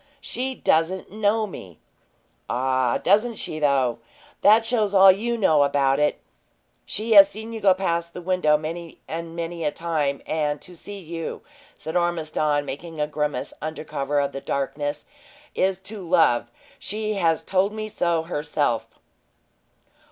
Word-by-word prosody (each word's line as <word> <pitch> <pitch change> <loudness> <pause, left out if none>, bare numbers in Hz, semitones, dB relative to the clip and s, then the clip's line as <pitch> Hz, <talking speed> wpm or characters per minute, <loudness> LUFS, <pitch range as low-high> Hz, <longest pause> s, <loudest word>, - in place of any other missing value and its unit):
"She 260 0 -4
doesn't 175 +1 +1
know 215 +1 +1
me." 95 - -10 0.7
"Ah, 130 0 +1
doesn't 220 +4 +2
she, 155 - -4
though? 135 -5 +2 0.4
That 220 +2 +6
shows 215 -4 +1
all 190 0 +9
you 235 +5 -1
know 160 -9 +4
about 140 -1 +2
it! 150 0 +1 0.7
She 220 +2 -4
has 200 -2 +9
seen 220 +3 -8
you 225 - -6
go 195 -2 +5
past 170 -3 -2
the 180 - -6
window 180 -4 +3
many 165 +2 -7
and 165 0 -6
many 170 0 -4
a 150 - +2
time; 150 -4 -2
and 150 -2 -1
to 180 - -11
see 200 +4 -8
you," 165 -3 -6 0.3
said 160 - -6
Ormiston, 155 -4 0
making 160 +4 -7
a 150 - +2
grimace 150 -3 -3
undercover 145 -2 -2
of 140 0 0
the 135 - -6
darkness, 145 +2 -3 0.5
"is 190 0 +1
to 205 +2 -8
love! 165 -10 +3 0.3
She 215 0 -3 0.2
told 195 +2 +1
me 215 0 -5
so 170 -5 0
herself." 145 -8 -1
165 Hz, 145 wpm, -24 LUFS, 150-195 Hz, 0.7 s, all